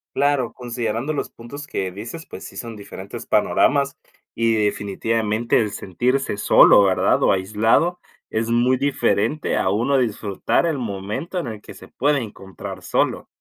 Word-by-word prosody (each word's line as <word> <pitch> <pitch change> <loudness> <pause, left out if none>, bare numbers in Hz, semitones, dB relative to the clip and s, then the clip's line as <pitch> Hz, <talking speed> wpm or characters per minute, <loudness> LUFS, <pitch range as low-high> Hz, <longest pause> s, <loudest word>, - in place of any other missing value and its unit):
Claro, 140 -4 +1
considerando 120 +2 -3
los 150 - -3
puntos 140 +6 -9
que 95 -9 -3
dices, 115 - -8
pues - - -9
sí 95 - -10
son 115 +3 -6
diferentes 100 -1 -9
panoramas 140 0 +2 0.4
y 115 0 +2
definitivamente 110 +2 0
el 105 -3 0
sentirse 120 +5 -1
solo, 100 - +7
¿verdad?, 95 -2 +2
o - - +5
aislado 110 - +2 0.3
es 115 +1 -1
muy 125 +2 +3
diferente 135 0 0
a 95 - +1
uno 120 +7 +2
disfrutar 110 - 0
el 155 -4 -1
momento 110 - -4
en 150 - -4
el 110 -2 -6
que - - -11
se - - -13
puede 145 +2 +1
encontrar 95 -4 -8
solo. - - 0
115 Hz, 150 wpm, -22 LUFS, 105-135 Hz, 0.4 s, solo